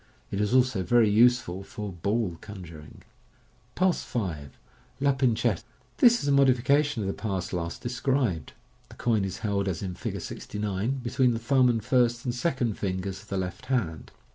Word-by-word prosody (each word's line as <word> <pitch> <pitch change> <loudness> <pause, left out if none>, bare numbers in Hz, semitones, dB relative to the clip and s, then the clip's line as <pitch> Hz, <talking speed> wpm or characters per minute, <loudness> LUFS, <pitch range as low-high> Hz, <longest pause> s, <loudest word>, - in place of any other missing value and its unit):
It 100 - -1
is 105 - 0
also 125 -6 +3
very 110 +4 +4
useful 115 -4 +3
for 105 +1 -6
" 85 -2 -14
ball 100 -3 0
" - - -30
conjuring. 85 -7 -11 0.7
Pass 185 -1 +2
5. 85 - -4 0.4
{La 140 +1 +3
Pincette). 120 -6 +1 0.2
— - - -36
This 240 -1 +6
is - - -2
a - - +3
modification 140 -1 +3
of - - -2
the 95 - -1
pass 95 -5 -3
last 85 -1 -4
described. 120 - -1 0.4
The - - -13
coin 110 -4 +1
is 95 -2 -3
held 100 -1 0
as 90 -2 -2
in 95 -2 -3
Fig. - - -4
69, 105 +5 -3
between 125 +1 +2
the - - -1
thumb 125 +2 +3
and 115 -3 -1
first 120 0 +2
and 120 - -1
second 125 -4 -1
fingers 95 0 -3
of 105 - -19
the 100 - -3
left 95 +7 -4
hand. 100 - -2
110 Hz, 185 wpm, -27 LUFS, 95-125 Hz, 0.7 s, This